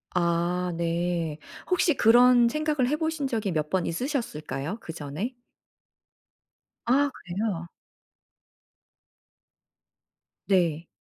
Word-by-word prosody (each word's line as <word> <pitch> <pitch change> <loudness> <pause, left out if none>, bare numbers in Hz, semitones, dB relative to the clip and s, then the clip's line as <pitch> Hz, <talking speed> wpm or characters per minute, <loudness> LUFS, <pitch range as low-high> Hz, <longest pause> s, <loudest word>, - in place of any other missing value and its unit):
아 175 +1 +1
네. 170 -2 -1 0.3
혹시 360 -3 +3
그런 240 0 +6
생각을 305 -2 0
해보신 310 -2 -1
적이 220 -5 -1
몇 155 -2 -1
번 185 0 0
있으셨을까요? 170 - -3
그전에? 165 - -5 1.5
아 280 +4 +3
그래요? 180 -2 -3 2.8
네. 170 -4 +1
185 Hz, 165 characters per minute, -26 LUFS, 170-250 Hz, 2.8 s, 그런